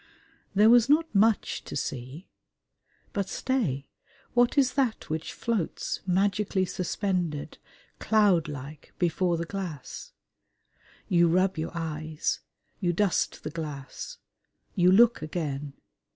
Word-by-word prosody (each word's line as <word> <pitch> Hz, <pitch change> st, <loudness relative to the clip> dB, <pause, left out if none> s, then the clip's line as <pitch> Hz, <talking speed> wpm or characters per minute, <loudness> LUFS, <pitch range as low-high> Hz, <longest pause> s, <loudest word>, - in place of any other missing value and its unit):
There 210 Hz, +3 st, +7 dB
was 240 Hz, 0 st, +6 dB
not 320 Hz, +2 st, +3 dB
much 215 Hz, +1 st, +2 dB
to -, -, -7 dB
see. 135 Hz, +5 st, -5 dB, 0.9 s
But 200 Hz, -2 st, -1 dB
stay! 180 Hz, -, -1 dB, 0.5 s
What 245 Hz, +3 st, +3 dB
is 265 Hz, -3 st, +4 dB
that 250 Hz, -, -1 dB
which 160 Hz, +1 st, -3 dB
floats, 220 Hz, -8 st, -2 dB
magically 195 Hz, +1 st, +1 dB
suspended, 180 Hz, -4 st, -2 dB, 0.4 s
cloudlike, 155 Hz, -9 st, +1 dB
before 175 Hz, 0 st, +1 dB
the 170 Hz, -, -3 dB
glass? 175 Hz, -6 st, -6 dB, 0.9 s
You 170 Hz, -1 st, +4 dB
rub 185 Hz, +3 st, +2 dB
your 160 Hz, -, -2 dB
eyes: 155 Hz, -1 st, -2 dB, 0.4 s
you 175 Hz, -3 st, +1 dB
dust 200 Hz, +1 st, 0 dB
the 155 Hz, -, -4 dB
glass: 145 Hz, -4 st, -6 dB, 0.6 s
you 180 Hz, 0 st, +4 dB
look 235 Hz, +4 st, +5 dB
again. 150 Hz, -3 st, -4 dB
180 Hz, 110 wpm, -27 LUFS, 155-210 Hz, 0.9 s, There